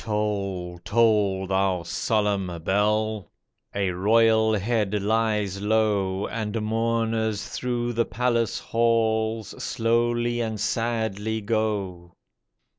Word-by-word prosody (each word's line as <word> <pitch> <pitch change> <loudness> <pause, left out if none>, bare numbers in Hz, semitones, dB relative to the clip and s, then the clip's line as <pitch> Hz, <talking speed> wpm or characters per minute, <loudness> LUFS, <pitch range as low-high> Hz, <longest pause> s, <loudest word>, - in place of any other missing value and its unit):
Toll, 100 -5 -2
toll, 105 -5 +2
thou 95 -2 0
solemn 95 -2 -1
bell! 105 +2 0 0.5
A 100 -2 0
royal 110 +3 +3
head 105 -1 0
lies 105 -2 0
low, 105 -3 +1
And 110 -1 -3
mourners 110 -1 0
through 120 -1 -2
the 115 0 +1
palace 120 -2 0
halls 110 -2 0
Slowly 120 +1 +1
and 110 -2 -3
sadly 110 -1 -1
go. 100 -5 -2
110 Hz, 95 wpm, -25 LUFS, 100-115 Hz, 0.5 s, royal